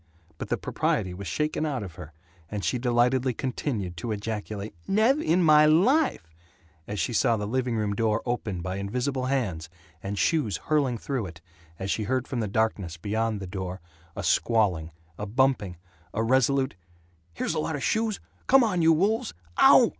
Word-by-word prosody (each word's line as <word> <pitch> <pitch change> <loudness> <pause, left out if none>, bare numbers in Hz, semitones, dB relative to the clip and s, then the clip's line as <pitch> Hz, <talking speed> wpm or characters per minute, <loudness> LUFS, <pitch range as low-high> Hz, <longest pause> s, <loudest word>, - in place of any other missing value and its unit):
But - - -5
the - - +1
propriety 90 -1 -1
was 95 +1 -7
shaken 150 - -1
out 140 -7 -2
of 90 -4 -8
her, 75 -1 -10 0.4
and 105 -4 -4
she 120 - 0
delightedly 125 +1 +2
continued 115 - -3
to 110 +7 -4
ejaculate 105 -1 -4
"Nev' 225 +9 +3
in 175 - +2
my 150 -1 +7
LIFE" 195 - +3 0.6
as 105 -1 -4
she 120 - -1
saw 115 +1 +3
the 105 - -3
living 125 +2 -1
room 105 -2 0
door 110 0 +1
opened 110 -7 -2
by 90 +2 -3
invisible 125 +6 -2
hands 105 -13 -1 0.3
and 100 +1 -4
shoes 140 - +1
hurling 140 -6 0
through 125 -3 -3
it, 80 -3 -11 0.4
as 95 +1 -3
she 110 - -1
heard 130 +1 -1
from 125 - -3
the 110 - -1
darkness 100 -5 -1
beyond 110 +3 -1
the 95 - -6
door 95 0 -5 0.4
a - - -4
squawling, 95 -9 +2 0.3
a 105 - -3
bumping, 110 -6 +1 0.4
a 110 - +1
resolute 130 +2 +2 0.6
"Here's - - -1
a 160 - -1
lot 155 0 -2
of 140 - -4
shoes. 220 - 0 0.3
Come 270 -1 +6
on, 190 -7 +1
you 165 0 +6
wolves. 195 - +1 0.2
Ow! - - +8
115 Hz, 175 wpm, -27 LUFS, 100-140 Hz, 0.6 s, Ow